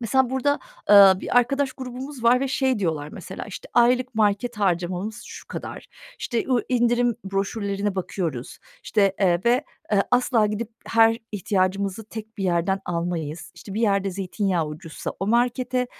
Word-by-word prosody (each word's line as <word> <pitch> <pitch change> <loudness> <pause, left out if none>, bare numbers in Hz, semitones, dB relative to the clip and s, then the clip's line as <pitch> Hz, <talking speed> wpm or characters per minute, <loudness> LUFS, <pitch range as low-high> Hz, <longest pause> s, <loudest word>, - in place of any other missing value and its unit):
mesela 255 +2 +2
burada, 265 +2 +1 0.3
ııı, 195 -2 +8
bir - - -2
arkadaş 270 +2 +1
grubumuz 255 0 -7
var 245 +2 +5
ve 275 - -1
şey 260 -2 +1
diyorlar 160 -6 -2
mesela, - - -7
işte, - - -9
"Aylık 250 +1 +3
market 215 +2 +1
harcamamız 185 +3 -1
şu - - -11
kadar. - - -7 0.3
İşte, 235 -3 -2
o 250 -2 +3
indirim 240 -1 +2
broşürlerine 200 +1 -2
bakıyoruz. 170 -8 -4 0.2
İşte, 200 -3 +2
eee, 175 -3 +3
ve, 245 +5 +3 0.3
ııı, 200 -1 +4
asla 245 -3 +3
gidip 210 +2 -3 0.2
her 225 0 +4
ihtiyacımızı 195 +1 -1
tek 220 0 -9
bir 195 - -2
yerden 180 +2 +1
almayız. 170 -2 -3
İşte, 195 - -10
bir 220 - -1
yerde 200 -3 +2
zeytinyağı 185 -2 -1
ucuzsa 155 +2 -7
o 195 - -1
markete, 250 +2 +1
210 Hz, 155 wpm, -24 LUFS, 190-245 Hz, 0.3 s, ııı